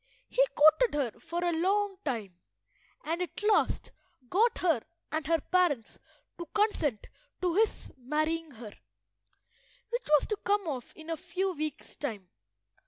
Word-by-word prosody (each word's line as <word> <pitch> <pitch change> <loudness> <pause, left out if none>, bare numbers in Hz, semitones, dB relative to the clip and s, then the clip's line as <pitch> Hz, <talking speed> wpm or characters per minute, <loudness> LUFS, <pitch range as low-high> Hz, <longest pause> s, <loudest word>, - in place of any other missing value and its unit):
He - - +4
courted 315 +8 +6
her 265 -7 -1
for 340 +2 -3
a 350 - +2
long 390 +4 +1
time, 210 - -3 0.6
and 330 +3 -2
at 360 +3 -4
last 420 0 +2 0.4
got 450 +6 +3
her 330 -10 +2 0.3
and 310 -2 -2
her 330 0 +3
parents 315 -8 +1 0.4
to 340 - -5
consent 320 - +1 0.4
to 355 -2 +2
his 435 +4 +1
marrying 310 +5 -1
her, 230 -5 -10 1.2
which 480 +1 -2
was 300 -2 +5
to 425 - 0
come 405 -2 0
off 260 -5 -4
in 320 +1 -8
a 325 - -1
few 370 +3 -2
weeks' 310 -2 -5
time. 210 -11 -5
330 Hz, 145 wpm, -30 LUFS, 290-380 Hz, 1.2 s, courted